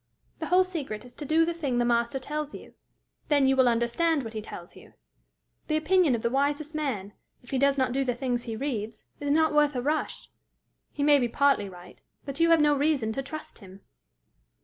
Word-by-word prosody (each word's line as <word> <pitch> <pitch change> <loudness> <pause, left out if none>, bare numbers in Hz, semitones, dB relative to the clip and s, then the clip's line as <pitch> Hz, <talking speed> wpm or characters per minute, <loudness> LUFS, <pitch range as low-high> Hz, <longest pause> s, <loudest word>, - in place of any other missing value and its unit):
The 320 - -4
whole 365 +1 +5
secret 290 -12 -5
is 245 - -13
to 295 - -6
do 320 +3 +3
the 340 - -1
thing 285 -7 -2
the 240 - +2
Master 235 +2 +1
tells 295 +2 -5
you: - - -12 0.5
then 285 -3 +3
you 270 - +3
will 260 -1 +4
understand 250 +7 +1
what 225 -1 -7
he 215 - -4
tells 175 -4 -10
you. - - -16 0.7
The 310 - +1
opinion 325 -3 +3
of 225 - -5
the 235 - +2
wisest 290 +3 0
man, 240 -10 -3 0.3
if 245 - -14
he 265 - 0
does 280 +1 +3
not 260 -2 +1
do 270 +2 0
the 250 -2 -1
things 245 -1 -2
he 225 -2 -4
reads, 225 -4 -4 0.2
is 290 - -3
not 315 +1 +3
worth 295 -1 +3
a 250 - -1
rush. 305 +3 -2 0.6
He 285 - -3
may 290 -1 +5
be 245 - +1
partly 275 -6 +2
right, 180 -1 -14 0.2
but 275 +1 -5
you 335 0 +4
have 330 -1 +6
no 295 -1 +4
reason 280 -6 +1
to 270 - -2
trust 310 +3 -8
him." 195 -2 -14
275 Hz, 215 wpm, -27 LUFS, 235-305 Hz, 0.7 s, have